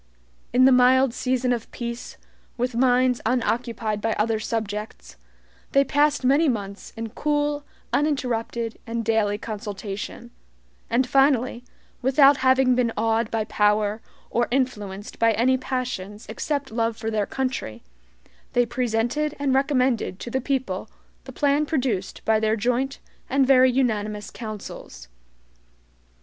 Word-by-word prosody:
In 255 +1 +5
the 265 - +7
mild 255 0 +5
season 255 -1 0
of 230 -2 -5
peace, 235 0 -6 0.4
with 250 +1 -1
minds 250 0 +3
unoccupied 230 -3 -1
by 225 +1 0
other 220 +1 0
subjects, 210 - -4 0.6
they 275 - +5
passed 290 0 +2
many 285 +4 +4
months 200 -4 -4
in 225 0 -4
cool, 295 +1 -1 0.3
uninterrupted, 235 -6 -1
and 230 0 -3
daily 215 -2 +1
consultation; 205 -2 -6 0.6
and 245 +3 +2
finally, 255 -2 +2 0.4
without 275 +2 +5
having 260 -1 +4
been 245 -2 +1
awed 225 +1 +1
by 225 -1 -1
power, 210 0 +1 0.3
or 240 0 +1
influenced 210 -6 -3
by 230 -1 +4
any 250 +4 +3
passions 245 -6 -4
except 285 -4 -3
love 230 0 -1
for 225 0 -3
their 210 -2 0
country, 255 - -3 0.7
they 245 0 +3
presented 240 +5 -1
and 280 -2 0
recommended 260 -7 +1
to 240 - -6
the 260 - 0
people 240 -7 -2 0.4
the 265 - -8
plan 285 +3 +2
produced 255 -11 -2
by 220 -1 +3
their 220 0 +1
joint 250 +5 -1 0.3
and 270 +1 +3
very 260 -1 +6
unanimous 215 -5 -1
councils. 210 - -8
240 Hz, 130 wpm, -24 LUFS, 220-260 Hz, 0.7 s, the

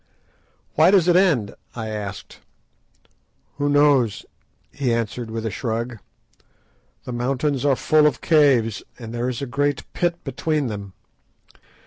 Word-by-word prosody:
"Why 155 +3 +5
does 190 -3 +4
it 175 - +4
end?" 160 - +3 0.2
I 110 -2 -4
asked. 105 -2 -6 1.2
"Who 145 0 +1
knows?" 145 -7 +3 0.5
he 135 -4 -1
answered 115 0 -2
with 115 0 -4
a 110 - -2
shrug; 115 +2 -3 1.0
"the 125 - -6
mountains 135 +3 -1
are 140 -2 +4
full 155 +3 +4
of 145 - -1
caves, 135 -9 +3 0.2
and 115 -2 -8
there 120 +1 -1
is 125 +2 -4
a - - -1
great 145 +2 -1
pit 175 -1 -1
between 155 -3 -1
them. 100 -3 -7
125 Hz, 135 wpm, -22 LUFS, 115-145 Hz, 1.2 s, Why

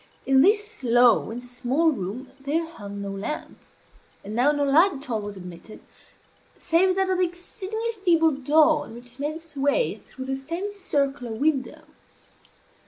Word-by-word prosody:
In 265 0 +5
this 415 +2 +2
low 240 -2 +4
and 240 +2 -6
small 250 +6 +1
room 245 +3 -5
there 295 +5 -1
hung 205 -11 -8
no 200 - -4
lamp; 195 +9 -5 0.7
and 205 - -6
now 250 +6 +4
no 290 -1 0
light 320 +8 +5
at 275 -1 -6
all 220 -2 0
was 205 -1 -7
admitted, 180 +3 -10 0.8
save 360 +2 +2
that 385 0 +1
of 370 - +1
the - - +4
exceedingly 385 +6 -4
feeble 330 -3 +4
dawn 295 0 +2
which 245 +2 -9
made 295 +2 -2
its 325 -2 -11
way 285 - +1
through 260 - -8
the 270 0 -2
semicircular 285 - -2
window. 275 +3 -1
285 Hz, 155 wpm, -25 LUFS, 245-335 Hz, 0.8 s, In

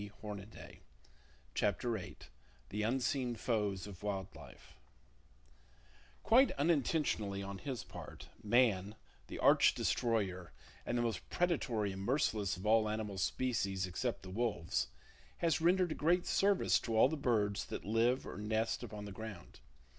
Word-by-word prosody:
[Page 105 0 -8
73] 105 0 -9 0.7
CHAPTER 105 +4 0
VIII 110 -5 -5 0.6
UNSEEN 125 +2 0
FOES 105 -4 -1
OF 100 -3 -10
WILD 100 -2 -3
LIFE - - -13 1.5
Quite 245 +4 +6
unintentionally 140 - 0
on 100 0 -6
his 130 -1 -4
part, - - -10
Man, 105 -3 +2 0.3
the - - -7
arch - - +5
destroyer 100 -8 0 0.3
and 120 - 0
the 120 - +1
most 115 -2 -3
predatory 125 - 0
and 95 0 -6
merciless 110 -5 0
of 95 - -9
all 110 0 +4
animal 105 -2 -3
species 100 -4 0
except 115 +7 -3
the 95 - -8
wolves, 95 - -1 0.5
has 165 -3 +1
rendered 180 +1 +3
a - - +1
great 175 +4 +2
service 200 -1 +3
to 115 -2 -2
all 110 - +7
the 155 - -2
birds 110 -8 0
that - - -6
live 115 +5 +2
or - - -7
nest 110 +2 -1
upon 105 -4 -7
the 100 - -7
ground. 105 -3 -9
110 Hz, 140 wpm, -35 LUFS, 100-130 Hz, 1.5 s, all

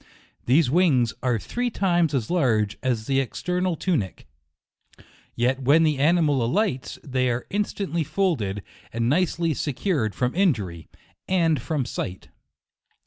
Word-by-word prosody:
These 130 +1 +4
wings 140 -9 +3
are 125 -3 +1
three 245 - -2
times 175 -8 +1
as 120 -1 -2
large 115 - +1
as 120 -5 -1
the 135 +2 +1
external 180 +6 -1
tunic, 150 - -2 1.1
yet 130 +3 0
when 145 +5 +4
the 155 -3 +1
ani 170 +5 +4
mal 145 -5 +2
alights, 130 - -1
they 130 -2 0
are 120 0 -2
instantly 200 -4 -1
folded, 145 - -1 0.3
and 115 0 -1
nicely 165 +2 +1
secured 140 - -1
from 125 0 0
injury, 105 - 0 0.4
and 165 -5 +2
from 150 -6 -2
sight. 95 -6 -5
140 Hz, 135 wpm, -24 LUFS, 120-175 Hz, 1.1 s, These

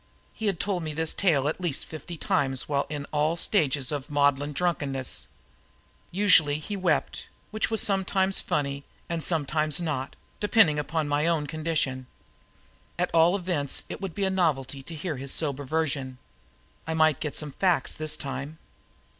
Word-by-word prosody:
He 220 - -3
had 195 -5 0
told 195 -3 -1
me 155 -2 -4
this 160 0 0
tale 150 -8 +2
at 155 - -2
least 170 -6 0
fifty 165 +2 -8
times 135 -4 0
while 140 -1 0
in 145 -1 -4
all 155 +2 +1
stages 145 - +2
of 145 -2 -4
maudlin 145 0 +2
drunkenness. 145 -5 -2 0.8
Usually 170 -7 +4
he 180 +7 -5
wept 190 -2 0 0.2
which 215 0 0
was 225 -1 +3
sometimes 195 -1 +1
funny 140 -1 -2 0.3
and 170 -1 -2
sometimes 155 -1 +1
not, 150 -6 -3 0.2
depending 205 -8 +4
on 160 -2 0
my 145 +2 +1
own 165 -3 +1
condition. 150 -5 -2 0.9
At 180 0 0
all 165 +3 +5
events 175 -7 0
it - - -6
would 190 -4 -5
be 200 - -1
a 190 - +1
novelty 145 -7 0
to 160 +5 -8
hear 155 -1 -4
his 135 +1 -2
sober 145 -3 0
version. 140 -3 -2 0.7
I 160 - -1
might 155 -3 +3
get 150 -3 -3
at - - -1
some 150 -2 -1
facts 175 -3 +1
this 155 0 -1
time. 140 +2 -6
155 Hz, 165 wpm, -27 LUFS, 140-175 Hz, 0.9 s, all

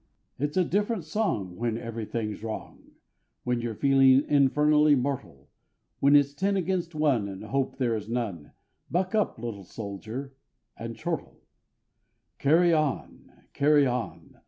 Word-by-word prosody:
It's 145 +5 -2
a 185 - +4
different 205 +2 0
song 155 - -2
when 115 -1 -1
everything's 115 -2 -4
wrong, 110 -1 -7 0.5
When 125 -1 0
you're 115 -2 -3
feeling 135 +1 +5
infernally 150 +1 +4
mortal; 115 - -3 0.5
When 140 +1 +5
it's 140 -1 +4
ten 195 +6 0
against 180 -2 -2
one, 140 -9 +2
and 95 -1 -7
hope 135 -1 -2
there 120 -4 +1
is 105 0 -6
none, 110 -11 -4 0.4
Buck 185 +2 0
up, 215 -1 +1
little 110 -4 -6
soldier, 110 +8 -7 0.4
and - - -6
chortle: - - -5 1.0
Carry 165 +4 +4
on! 155 -3 -2 0.2
Carry 145 0 +4
on! 125 -3 -4
135 Hz, 135 wpm, -27 LUFS, 115-150 Hz, 1.0 s, feeling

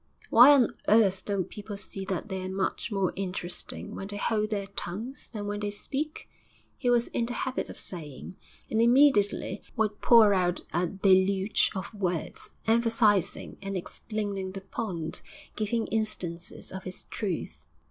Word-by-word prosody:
'Why 245 +5 +9
on 250 -5 +3
earth 205 -4 +4
don't 200 -4 -1
people 205 -1 -7
see 195 -1 -4
that 190 +1 -3
they're 190 -2 -4
much 190 +4 -2
more 195 -3 0
interesting 180 -2 -4
when 195 - -6
they 205 0 -5
hold 215 +1 0
their 205 -2 -2
tongues 210 +6 -5
than 210 -3 -5
when 205 0 -3
they 205 0 -2
speak?' 280 +9 -4 0.5
he 245 - -1
was 240 -1 +3
in 235 - -1
the 240 - -2
habit 260 0 -2
of - - -9
saying, 160 -1 -7 0.3
and 220 - +1
immediately 240 -4 +4
would 215 -3 0
pour 225 -4 +7
out 180 -2 +1
a 175 0 +1
deluge 190 +1 +3
of 190 +2 -5
words, 180 -6 -3 0.2
emphasising 225 -4 +2
and 195 -1 -3
explaining 200 0 -4
the 195 - -6
point, 185 -5 -3 0.3
giving 220 +1 0
instances 185 -6 -3
of 190 0 -7
its 185 - -7
truth.... 80 - -4
200 Hz, 155 wpm, -28 LUFS, 190-220 Hz, 0.5 s, Why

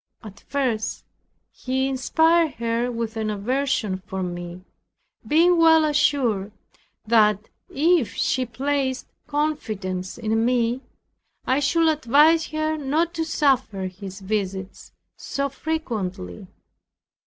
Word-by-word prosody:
At 215 -1 -11
first 250 -6 -2 0.5
he 265 +1 -2
inspired 320 +4 +2
her 235 +1 -1
with 230 -1 -4
an 220 -1 -1
aversion 220 -2 -1
for 190 -3 -3
me, 175 0 -6 0.6
being 335 +3 +4
well 320 -1 +6
assured 255 -9 +1 0.5
that 210 -2 +3 0.2
if 315 -3 +2
she 255 -1 0
placed 265 +2 -1 0.2
confidence 215 -12 -3
in 225 -1 0
me, 240 +1 +1 0.6
I 260 +2 +2
should 325 +4 +2
advise 310 +2 +4
her 310 0 -1
not 310 +4 0
to 330 -1 -1
suffer 265 -10 +1
his 190 +1 -8
visits 190 -2 -4 0.3
so 280 0 -3
frequently. 215 - -4
255 Hz, 110 wpm, -23 LUFS, 210-300 Hz, 0.6 s, well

